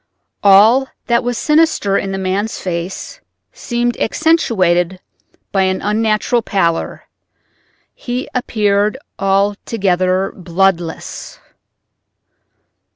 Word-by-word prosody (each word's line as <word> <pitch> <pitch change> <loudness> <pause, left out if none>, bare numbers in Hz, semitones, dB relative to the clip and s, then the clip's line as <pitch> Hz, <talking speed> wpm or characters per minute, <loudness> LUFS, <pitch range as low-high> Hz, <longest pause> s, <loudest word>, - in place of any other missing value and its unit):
All 215 +7 +6 0.2
that 235 0 +1
was 245 -1 -2
sinister 300 -10 +2
in 195 -1 -1
the 195 - -3
man's 195 +3 -2
face 180 - -5 0.3
seemed 240 0 -2
accentuated 185 - +1 0.5
by 195 - +1
an 190 0 +1
unnatural 215 +3 0
pallor—he 200 +6 -5
appeared 210 -2 0 0.2
altogether 195 -2 0
bloodless. 175 -2 -2
200 Hz, 80 wpm, -16 LUFS, 185-235 Hz, 0.5 s, All